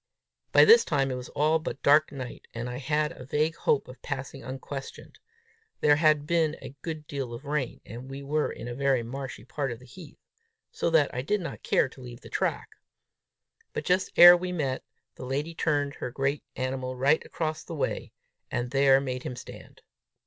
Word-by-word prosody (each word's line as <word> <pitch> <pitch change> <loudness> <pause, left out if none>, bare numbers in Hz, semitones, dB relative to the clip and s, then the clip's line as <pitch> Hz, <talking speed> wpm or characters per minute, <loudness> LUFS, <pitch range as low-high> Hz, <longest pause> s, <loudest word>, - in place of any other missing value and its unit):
By - - +8
this 460 +2 +8
time 135 -3 0
it - - -2
was 125 0 -7
all 155 +2 +2
but 155 - -6
dark 150 +2 +5
night, 130 -3 -8
and 115 +1 -3
I 125 0 -5
had 150 +3 0
a 150 - -10
vague 150 +5 0
hope 145 - +1
of 125 +1 -12
passing 135 -1 -5
unquestioned: 135 +2 -8 0.6
there 145 -1 +5
had 155 -2 +3
been 160 -1 +1
a 135 0 -9
good 155 -2 -5
deal 135 -5 -4
of 135 - -11
rain, 140 -3 -2
and 120 +5 -9
we 135 +1 -7
were 150 +2 0
in 115 - -8
a 120 - -4
very 135 -1 +1
marshy 130 -1 -6
part 135 0 -3
of 120 - -5
the 125 - -16
heath, 150 +5 -13 0.5
so - - -1
that 160 -3 +3
I 125 - -2
did 205 +10 0
not 170 - -6
care - - +2
to 130 - -15
leave 120 -1 -10
the - - -12
track. - - -1 1.0
But, - - -4
just 185 +1 +2
ere 175 0 +11
we 180 +1 -3
met, 140 -7 -2 0.3
the - - -10
lady 145 +5 -2
turned 145 -3 0
her - - -5
great 135 +3 -1
animal 130 0 -3
right 140 +5 +3
across 155 -1 -3
the 165 - -7
way, 145 - -2 0.4
and 125 0 -2
there 135 -1 +5
made 130 -2 -3
him 125 - -5
stand. - - -12
140 Hz, 200 wpm, -28 LUFS, 130-155 Hz, 1.0 s, ere